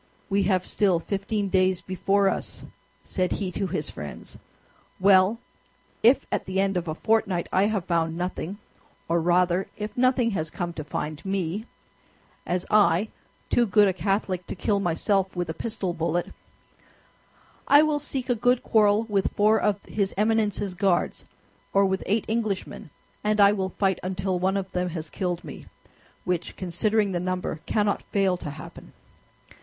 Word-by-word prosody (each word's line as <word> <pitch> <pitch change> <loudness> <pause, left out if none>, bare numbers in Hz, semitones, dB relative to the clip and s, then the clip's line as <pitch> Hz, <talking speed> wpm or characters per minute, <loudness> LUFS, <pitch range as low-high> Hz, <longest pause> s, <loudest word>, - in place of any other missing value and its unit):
"We 200 +1 +3
have 185 -2 +1
still 195 -4 +2
fifteen 200 +3 -2
days 185 -1 +2
before 195 +2 +1
us," - - -2 0.4
said 185 -2 -1
he 190 -3 -3
to 195 +1 -2
his 155 -3 -3
friends, 75 -1 -8 0.6
"well, 190 +2 +5 0.6
if 240 +5 +5
at - - -2
the 190 0 -1
end 195 0 +1
of 175 -1 -2
a 155 - -2
fortnight 195 -4 +1
I 190 +2 +4
have 205 -5 -1
found 165 -1 0
nothing, 180 +1 -4 0.5
or 170 0 +1
rather 180 +2 +2
if 210 0 -5
nothing 250 -2 +3
has 160 -5 -2
come 175 +2 -4
to 155 - -6
find 150 0 -5
me, 195 +2 -2 0.8
as 180 0 -1
I, 210 -1 +4 0.4
too 240 -1 +3
good 205 +1 +5
a 190 - +1
Catholic 190 -1 -1
to - - -5
kill 200 +2 0
myself 190 +2 0
with 175 -2 -2
a - - -5
pistol 190 -1 -3
bullet, 170 +1 -2 1.3
I 290 +1 +7
will 305 -1 +1
seek 270 -3 -2
a 245 - +3
good 245 +2 +2
quarrel 210 0 +3
with 205 -4 -1
four 215 +2 +4
of 205 -1 0
his 200 -2 -2
Eminence's 210 -2 +1
Guards 180 -1 0 0.5
or 200 0 +5
with 190 0 0
eight 210 +2 +1
Englishmen, 215 -7 -3 0.3
and 210 0 +1
I 200 0 +7
will 190 -2 -1
fight 190 -3 +1
until 185 0 -2
one 190 +2 +1
of 190 -1 -4
them 180 0 -1
has 160 -2 -6
killed 180 -1 -2
me, 150 - -10 0.6
which, 180 -2 -2
considering 200 +3 0
the 175 - -1
number, 180 -2 -3
cannot 205 -1 +1
fail 195 -2 +1
to 150 - -6
happen. 145 - -11
190 Hz, 165 wpm, -25 LUFS, 180-210 Hz, 1.3 s, I